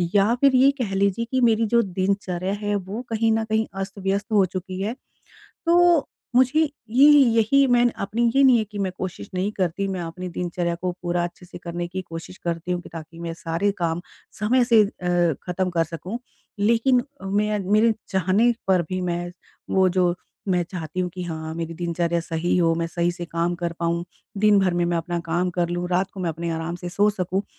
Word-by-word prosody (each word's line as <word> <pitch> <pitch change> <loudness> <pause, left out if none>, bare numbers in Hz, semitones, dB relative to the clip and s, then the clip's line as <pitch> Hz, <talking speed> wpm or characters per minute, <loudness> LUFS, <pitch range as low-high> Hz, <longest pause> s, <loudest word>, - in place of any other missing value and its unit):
या 205 +3 +4
फिर 275 -2 +5
ये 270 +2 +6
कह 195 -4 -2
लीजिए 200 +3 +1
कि, 260 - +1
मेरी 230 -1 +4
जो 235 +2 +4
दिनचर्या 190 -1 -1
है 205 0 0
वो 200 +4 -4
कहीं 225 0 +1
न 220 0 +1
कहीं 220 0 +1 0.2
अस्त-व्यस्त 195 +2 -3
हो 200 -3 +5
चुकी 185 +1 -5
है। 215 +4 -1 0.7
तो, 345 -2 +4 0.3
मुझे 260 +5 +4 0.3
ये 255 +6 +6
यही 270 -1 +5
मैं 240 0 +5 0.2
अपनी 220 +4 -2
ये 275 - +5
नहीं 255 -2 +7
है 220 - +1
कि 205 0 -10
मैं 190 - -1
कोशिश 180 - -6
नहीं 185 +3 -1
करती। 190 +1 0
मैं 190 -2 -3
अपनी 175 +2 -6
दिनचर्या 175 -1 -1
को 185 - -1
पूरा 175 0 0
अच्छे 175 +1 -7
से - - -10
करने 175 0 -5
की 185 +2 -4
कोशिश 170 +1 -9
करती 170 +1 -3
हूँ 175 -1 -1
कि, - - -12
ताकि 165 +1 -9
मैं 170 -1 -4
सारे 170 +4 -1
काम 170 -1 -1 0.4
समय 240 +4 +3
से 230 -3 +6
अ, 175 -4 0
ख़त्म 180 +1 -1
कर 170 -2 +1
सकूँ। 180 +7 -6 0.4
लेकिन 235 +4 +3 0.2
अ, - - -8
मैं 210 +2 0
मेरे 220 +1 +5 0.2
चाहने 190 +5 +3 0.2
पर 185 -2 +4
भी 185 0 -2
मैं, 175 0 -2 0.4
वो 190 -1 +4
जो, 180 -1 +2 0.3
मैं 180 -2 +2
चाहती 165 -1 -5
हूँ 180 -1 0
कि 180 -1 -5
हाँ 160 -2 -5
मेरी 165 0 -4
दिनचर्या 170 0 -1
सही 165 +1 -1
हो, 165 -2 +3
मैं 165 0 -1
सही 170 +1 0
से 175 0 -6
काम 170 +1 -1
कर 170 -1 -3
पाऊँ, 170 0 0 0.3
दिन-भर 200 -3 +4
में 175 0 +1
मैं 170 0 0
अपना 170 +1 -2
काम 175 +2 +1
कर 170 - +1
लूँ, 175 0 -2
रात 185 +1 0
को 195 - -9
मैं 180 -2 -1
अपने 170 +1 -4
आराम 165 +1 -3
से 175 - -4
सो 205 +4 +3
सकूँ। 190 0 -2
185 Hz, 205 wpm, -23 LUFS, 175-210 Hz, 0.7 s, नहीं